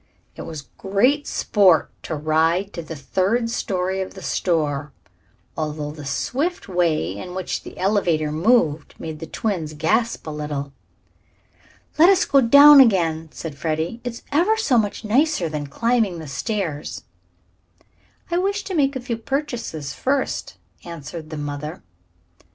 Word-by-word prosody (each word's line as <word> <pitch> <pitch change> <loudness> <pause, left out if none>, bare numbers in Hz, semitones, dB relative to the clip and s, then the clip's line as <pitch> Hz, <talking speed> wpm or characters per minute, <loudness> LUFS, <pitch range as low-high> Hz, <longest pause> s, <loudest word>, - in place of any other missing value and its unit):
It - - -8
was 155 -3 -7 0.2
great 245 +10 +2
sport 185 -7 +3
to 160 - -3
ride 160 +6 +1
to 170 - -5
the 160 0 -8
third 195 - 0
story 190 -3 -1
of 190 - -6
the 190 - -10
store, 150 -4 -1 0.6
although 150 -1 -3
the 150 -2 -9
swift 305 - -2
way 175 -4 0
in 180 -1 -7
which 185 - -3
the - - -11
elevator 180 -6 +1
moved 160 -3 +2
made 160 -1 -7
the 165 - -7
twins 175 -8 -3
gasp 195 +10 0
a 155 - -5
little. 145 -2 -4 1.3
"Let 340 +4 +8
us 380 -2 +4
go 275 - +4
down 285 +4 +9
again," 165 -9 +2
said 160 -3 -7
Freddie. 160 +9 -2
"It's 245 -1 -6
ever 355 +10 +3
so 275 - +3
much 210 +1 -2
nicer 245 - +2
than 150 -2 -4
climbing 225 - +1
the 160 -2 -8
stairs." 165 -1 -3 1.3
"I 345 - +2
wish 400 +2 -1
to 385 - -6
make 280 -4 +2
a 260 - -3
few 245 -2 -3
purchases 230 - -4
first," 270 +1 -2 0.3
answered 165 -1 -8
the 155 - -6
mother. 145 +1 -5
180 Hz, 145 wpm, -22 LUFS, 155-240 Hz, 1.3 s, down